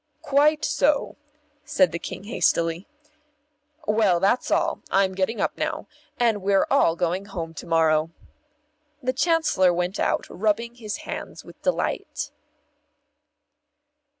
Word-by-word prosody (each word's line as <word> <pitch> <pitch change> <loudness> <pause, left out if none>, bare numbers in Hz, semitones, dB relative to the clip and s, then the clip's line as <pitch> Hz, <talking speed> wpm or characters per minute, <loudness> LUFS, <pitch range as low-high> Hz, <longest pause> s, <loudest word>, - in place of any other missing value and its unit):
"Quite 300 +2 +3
so," 290 +1 +1 0.5
said 295 -2 +2
the 170 - -4
King - - -7
hastily. 170 -4 0 1.0
"Well, 210 -5 +3
that's 200 +7 +1
all - - +1
I'm 195 -1 +2
getting 195 +4 -1
up - - 0
now. 310 0 -2 0.3
And 230 -4 +2
we're 195 0 +3
all 220 -12 +4
going 180 +3 -1
home 170 -5 -6
to 165 - -9
morrow." 160 -1 +3 0.9
The 255 +1 0
Chancellor 320 - +3
went 180 +3 -2
out, - - 0
rubbing 220 +4 -1
his 220 -3 -5
hands - - -7
with - - -15
delight. - - -2
200 Hz, 125 wpm, -24 LUFS, 175-255 Hz, 1.0 s, all